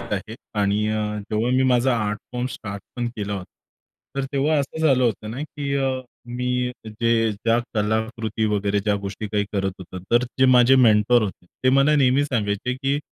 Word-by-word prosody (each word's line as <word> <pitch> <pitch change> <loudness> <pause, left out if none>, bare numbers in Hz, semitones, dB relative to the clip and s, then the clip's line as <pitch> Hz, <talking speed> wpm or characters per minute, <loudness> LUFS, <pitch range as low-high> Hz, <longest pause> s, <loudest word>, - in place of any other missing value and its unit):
आहे 110 -1 -5 0.2
आणि 100 +1 +1
अ, 105 -1 -1
जेव्हा 110 +3 0
मी 130 - +3
माझा 120 0 +3
आर्ट 105 -1 -1
फॉर्म 125 0 -2
स्टार्ट 100 -5 -7
पण 120 -1 -1
केला 105 -1 -3
होता, 95 - -5 0.7
तर 135 - 0
तेव्हा 145 +3 +2
असं 160 +3 -1
झालं 130 -3 +4
होतं 110 -1 -1
ना 130 +6 -5
की 145 -2 -5
अ, 135 -1 +1 0.4
मी 125 0 -1
जे 115 0 +1
ज्या 115 +3 +1 0.2
कलाकृती 110 +1 -1
वगैरे 100 0 0
ज्या 105 0 +1
गोष्टी 100 +2 -4
काही 105 -1 0
करत 95 -2 -1
होतात 95 +1 -8
तर 120 +1 +4
ते 130 +2 0
माझे 125 +1 +6
मेंटर 115 -1 +5
होते. 95 -3 -5 0.2
ते 130 - +3
मला 140 +3 +4
नेहमी 135 +1 +3
सांगायचे 115 -2 -1
की 135 +2 -1
115 Hz, 185 wpm, -23 LUFS, 105-130 Hz, 0.7 s, माझे